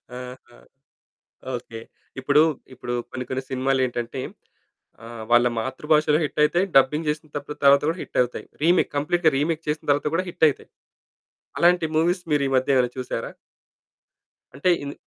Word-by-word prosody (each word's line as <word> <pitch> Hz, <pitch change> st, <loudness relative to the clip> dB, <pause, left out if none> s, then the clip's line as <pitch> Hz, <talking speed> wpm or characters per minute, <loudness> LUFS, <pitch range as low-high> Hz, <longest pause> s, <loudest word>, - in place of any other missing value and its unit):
ఆహా! 125 Hz, -1 st, -10 dB, 1.0 s
ఓకే. 115 Hz, -2 st, -9 dB, 0.4 s
ఇప్పుడూ, 145 Hz, +3 st, +4 dB, 0.3 s
ఇప్పుడు 120 Hz, 0 st, -5 dB, 0.2 s
కొన్ని 130 Hz, 0 st, -5 dB
కొన్ని 130 Hz, 0 st, -2 dB
సినిమాలేంటంటే 130 Hz, -2 st, -1 dB, 0.8 s
ఆహ్, 115 Hz, -1 st, -8 dB
వాళ్ళ 120 Hz, +1 st, +5 dB
మాతృభాషలో 150 Hz, +5 st, +1 dB
హిట్ 150 Hz, +1 st, -3 dB
అయితాయి. 175 Hz, +5 st, +2 dB
డబ్బింగ్ 150 Hz, +4 st, +4 dB
చేసింతపుడు 150 Hz, -1 st, -4 dB
తర్వాత 140 Hz, 0 st, +6 dB
కూడా 165 Hz, -, -1 dB
హిట్ -, -, -5 dB
అవుతాయి. 125 Hz, 0 st, -5 dB, 0.2 s
రీమేక్, 175 Hz, +3 st, +3 dB
కంప్లీట్‌గా 160 Hz, +3 st, +2 dB
రీమేక్ 155 Hz, +3 st, -1 dB
చేసిన 150 Hz, 0 st, -3 dB
తర్వాత 145 Hz, +1 st, +2 dB
కూడా 185 Hz, +3 st, +1 dB
హిట్ 165 Hz, -, +1 dB
అయితాయి. 145 Hz, -, -5 dB, 0.9 s
అలాంటి 175 Hz, -1 st, +4 dB
మూవీస్ 175 Hz, +3 st, +2 dB
మీరీ 145 Hz, -2 st, +2 dB
మధ్య 130 Hz, +1 st, +2 dB
ఏమైనా 125 Hz, -1 st, +3 dB
చూసారా? 130 Hz, -1 st, -4 dB, 1.2 s
అంటే 145 Hz, +6 st, 0 dB
ఇన్ 140 Hz, 0 st, -5 dB
140 Hz, 135 wpm, -23 LUFS, 130-155 Hz, 1.2 s, తర్వాత